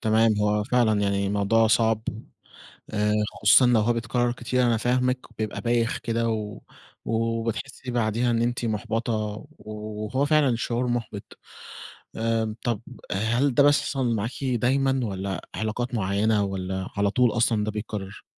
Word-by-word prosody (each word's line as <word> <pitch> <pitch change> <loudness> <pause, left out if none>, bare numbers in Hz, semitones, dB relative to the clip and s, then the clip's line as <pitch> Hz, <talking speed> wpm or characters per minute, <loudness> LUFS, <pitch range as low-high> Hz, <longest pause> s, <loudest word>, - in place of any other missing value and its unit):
تمام، 110 0 +3
هو 105 0 +1
فعلًا 115 -3 +2
يعني 100 -1 0
موضوع 105 +3 +2
صعب 110 -1 +2 0.9
آآ 105 0 +1 0.3
خصوصًا 105 +5 +7
لو 120 -2 +4
هو 115 +3 +2
بيتكرر 120 +1 0
كتير، 125 +1 -1
أنا 115 -2 +3
فاهمِك، 125 +2 +1 0.2
بيبقى 110 -1 -3
بايخ 120 -1 +1
كده 115 0 -1
و 105 -2 -3 0.5
وبتحسي 115 +3 -2
بعديها 120 +1 +1
إن 115 0 +1
أنتِ 120 0 -1
مُحبَطة 115 +2 -2
و 105 0 -4 0.6
وهو 130 +6 0
فعلًا 145 -4 +3
شعور 120 +1 -1
مُحبِط. 115 -4 -4 0.8
آآ 115 -1 0
طب 120 -4 0 0.3
هل 120 +7 +1
ده 140 - +5
بيحصل 135 -4 +2
معاكِ 110 +3 -2
دايمًا، 130 +2 +1
والّا 95 -2 -3
علاقات 120 +3 -3
معينة 105 +1 +1
والّا 95 -1 -3
على 100 0 +2
طول 125 +2 +3
أصلًا 115 -2 +2
ده 110 - -1
بيتكرر؟ 105 -2 -6
115 Hz, 145 wpm, -25 LUFS, 105-120 Hz, 0.9 s, خصوصًا